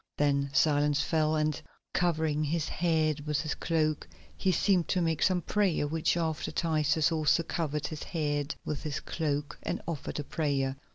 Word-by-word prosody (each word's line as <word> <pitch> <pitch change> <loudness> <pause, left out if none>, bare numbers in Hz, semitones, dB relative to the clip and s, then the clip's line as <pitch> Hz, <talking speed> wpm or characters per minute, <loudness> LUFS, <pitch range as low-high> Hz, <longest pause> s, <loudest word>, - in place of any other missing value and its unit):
Then 140 -1 +2
silence 145 0 +3
fell 155 0 +1
and, 155 0 0 0.3
covering 160 -4 +1
his 160 +1 -1
head 155 -3 0
with 150 0 +1
his 155 -2 -2
cloak, 155 -2 0 0.3
he 190 - +1
seemed 185 -1 +2
to 185 - +1
make 165 -3 0
some 180 -2 +2
prayer, 200 -6 +1
after 145 - -5
which 165 +1 +1 0.4
Titus 160 0 +2
also 160 +1 +2
covered 150 -3 -2
his 155 -2 -5
head 145 -3 -2
with 150 - -3
his 150 -2 -3
cloak 145 -2 -3
and - - -2
offered 155 -3 -4
a - - -2
prayer. 140 -3 -1
155 Hz, 165 wpm, -30 LUFS, 145-165 Hz, 0.4 s, silence